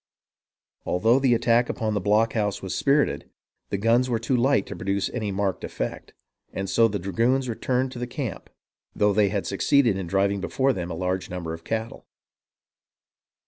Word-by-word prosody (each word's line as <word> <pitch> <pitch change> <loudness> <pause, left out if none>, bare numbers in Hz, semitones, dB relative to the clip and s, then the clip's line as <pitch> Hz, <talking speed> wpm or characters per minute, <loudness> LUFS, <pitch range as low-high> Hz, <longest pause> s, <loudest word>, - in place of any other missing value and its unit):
Although 115 +8 +2
the 130 -3 +3
attack 120 +1 +2
upon 110 -1 -2
the 105 - -1
blockhouse 105 0 +1
was 95 - -4
spirited, 140 - +1 0.4
the 100 - -1
guns 115 +5 +2
were 120 - +1
too 115 +3 -1
light 125 -3 +2
to - - -7
produce 100 +1 -1
any 110 -4 -3
marked 95 -1 -2
effect, - - -5 0.4
and 95 - -4
so 115 +4 +4
the 105 -2 -2
dragoons 115 +8 0
returned 125 +2 -1
to 125 - -8
the 125 - -3
camp, 125 - -5 0.5
though 105 0 +3
they 100 -1 +3
succeeded 115 +1 +2
in 90 - -5
driving 100 +2 +1
before 135 +6 +1
them 90 -5 -4
a 85 - -4
large 90 +1 -2
number 85 -3 -5
of 85 0 -9
cattle. 110 +3 -4
110 Hz, 170 wpm, -25 LUFS, 95-120 Hz, 0.5 s, so